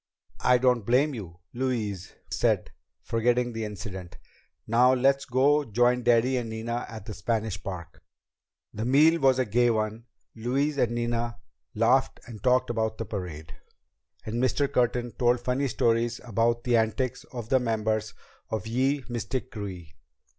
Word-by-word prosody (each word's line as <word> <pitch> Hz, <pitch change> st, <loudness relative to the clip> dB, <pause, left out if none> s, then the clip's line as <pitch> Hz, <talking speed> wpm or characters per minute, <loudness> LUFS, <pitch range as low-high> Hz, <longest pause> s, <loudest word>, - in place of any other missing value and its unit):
"I 125 Hz, 0 st, +4 dB
don't 125 Hz, -2 st, +2 dB
blame 130 Hz, +7 st, +2 dB
you," 90 Hz, -8 st, -8 dB, 0.2 s
Louise 115 Hz, -7 st, -3 dB, 0.2 s
said, -, -, +1 dB, 0.3 s
forgetting 120 Hz, +1 st, +1 dB
the 115 Hz, 0 st, -3 dB
incident. 95 Hz, -4 st, -7 dB, 0.5 s
"Now 125 Hz, +3 st, +4 dB
let's 135 Hz, +2 st, +2 dB
go 140 Hz, +4 st, +3 dB
join 120 Hz, +1 st, +2 dB
Daddy 120 Hz, +2 st, +3 dB
and 120 Hz, -2 st, -3 dB
Nina 115 Hz, +2 st, -4 dB
at 110 Hz, -3 st, -9 dB
the 110 Hz, -, -6 dB
Spanish 110 Hz, -2 st, -2 dB
Park." 90 Hz, -4 st, -7 dB, 0.7 s
The 110 Hz, -, -4 dB
meal 150 Hz, +7 st, +5 dB
was 135 Hz, -1 st, +4 dB
a 130 Hz, -, +1 dB
gay 120 Hz, +3 st, +3 dB
one. 110 Hz, 0 st, -1 dB, 0.3 s
Louise 135 Hz, +6 st, -1 dB
and 120 Hz, -2 st, +2 dB
Nina 120 Hz, 0 st, -2 dB, 0.4 s
laughed -, -, +2 dB
and 115 Hz, -4 st, -10 dB
talked 125 Hz, -1 st, +2 dB
about 110 Hz, -1 st, -1 dB
the 115 Hz, -, -4 dB
parade, 85 Hz, -6 st, -6 dB, 0.7 s
and 115 Hz, +3 st, -2 dB
Mr. 140 Hz, +2 st, +2 dB
Curtin 120 Hz, 0 st, +1 dB
told 120 Hz, +1 st, +2 dB
funny 125 Hz, +3 st, 0 dB
stories 115 Hz, 0 st, +1 dB
about 115 Hz, 0 st, 0 dB
the 120 Hz, -2 st, +3 dB
antics 115 Hz, +3 st, -1 dB
of 120 Hz, -3 st, -8 dB
the 130 Hz, -, +4 dB
members 110 Hz, -3 st, -1 dB, 0.3 s
of 110 Hz, -2 st, -3 dB
Ye 130 Hz, +4 st, 0 dB
Mystic 120 Hz, +1 st, -4 dB
Krewe. 90 Hz, -7 st, -7 dB
120 Hz, 150 wpm, -27 LUFS, 110-125 Hz, 0.7 s, meal